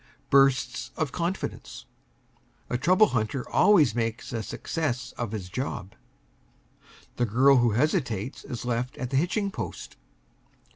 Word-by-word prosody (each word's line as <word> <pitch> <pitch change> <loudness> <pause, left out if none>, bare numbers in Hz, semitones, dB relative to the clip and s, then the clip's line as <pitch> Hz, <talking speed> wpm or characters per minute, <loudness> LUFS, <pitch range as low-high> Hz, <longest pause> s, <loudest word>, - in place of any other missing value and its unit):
BURSTS 135 -1 +3
OF 155 -3 -1
CONFIDENCE. 175 +4 -4 0.9
A 125 - +1
trouble 185 +8 +4
hunter 120 +2 -2
always 175 - +5
makes 115 +1 -3
a 115 - -2
success 125 0 -3
of 120 -4 -5
his 105 -5 -5
job. 100 -3 -5 1.2
The 120 - +1
girl 130 +5 +5
who 120 -3 +3
hesitates 130 - -1
is 125 -3 -6
left 125 +1 -2
at 125 0 -4
the 135 - +1
hitching 195 +6 0
post. - - -7
125 Hz, 130 wpm, -27 LUFS, 115-155 Hz, 1.2 s, always